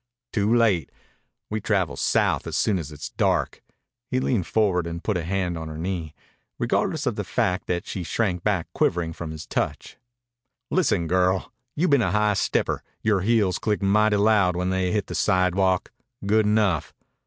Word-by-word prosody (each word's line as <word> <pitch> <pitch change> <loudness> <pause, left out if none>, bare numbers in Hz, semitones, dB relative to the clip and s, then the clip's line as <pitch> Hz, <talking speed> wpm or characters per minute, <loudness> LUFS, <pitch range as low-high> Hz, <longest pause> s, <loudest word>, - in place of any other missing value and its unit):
"Too 105 0 +1
late. 110 - +3 0.6
We 110 0 -2
travel 95 -5 0
south - - +1
soon 100 -4 +2
as 75 -3 -6
it's 75 -1 -7
dark." - - 0 0.5
He 130 0 0
leaned 120 -8 0
forward 95 -6 +1
and 85 +1 -6
put 105 - 0
a 90 - 0
hand 90 -1 -2
on 80 - -6
her 80 0 -7
knee, 85 -2 -4 0.4
regardless - - 0
of - - -1
the - - -1
fact 90 0 -1
that 90 -1 -2
she 95 - -5
shrank 90 0 -1
back 100 -6 +1
quivering 85 -2 0
from 80 -1 -6
his 80 -1 -7
touch. - - -3 0.7
"Listen, 130 - +2
girl. 90 +2 +1 0.2
You 170 +5 +1
been 140 -5 +4
a 105 - +1
high 105 +2 +2
stepper. - - 0 0.2
Yore 105 -3 +2
heels 105 -3 +2
click 105 -2 -1
mighty 105 +2 +3
loud 100 -4 +3
when 90 +1 -1
they 95 -1 0
hit 105 -2 0
the - - -7
sidewalk. 95 +1 +1 0.3
Good 105 +1 +3
enough. 105 -6 +1
95 Hz, 175 wpm, -24 LUFS, 90-105 Hz, 0.7 s, been